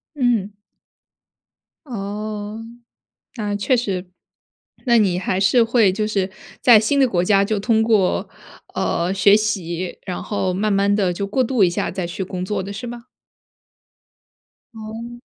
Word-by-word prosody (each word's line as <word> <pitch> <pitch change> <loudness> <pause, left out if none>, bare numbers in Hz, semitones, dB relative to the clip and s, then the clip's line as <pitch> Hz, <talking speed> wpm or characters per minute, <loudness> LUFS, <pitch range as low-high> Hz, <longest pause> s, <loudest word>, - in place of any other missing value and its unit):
嗯。 235 -7 0 1.3
哦， 210 -1 -5 0.8
那 210 -3 -2
确 225 +6 +1
实。 190 -6 -3 0.8
那 235 -2 +5
你 185 -4 +2
还 185 0 -1
是 230 +4 +4
会 225 -4 +3
就 210 +3 -1
是 195 -3 -1 0.3
在 235 -3 +7
新 275 +7 +1
的 265 - +4
国 180 -5 +1
家 200 +1 +4
就 210 +1 -1
通 220 +2 +2
过， 215 -5 +2 0.5
呃， 175 +3 0
学 200 +1 +5
习， 185 -5 -2
然 180 -2 -5
后 190 -3 -1
慢 210 +4 0
慢 200 0 +2
地 195 -4 +1
就 200 +3 -3
过 255 +6 +1
渡 240 -4 +2
一 175 - +3
下 - - -2
再 185 -1 -3
去 175 +3 -5
工 185 -1 -4
作 200 0 -2
的， 200 - -6
是 225 +5 -6
吧？ 240 0 -8 1.7
哦。 225 +2 -8
205 Hz, 160 characters per minute, -20 LUFS, 190-225 Hz, 1.7 s, 在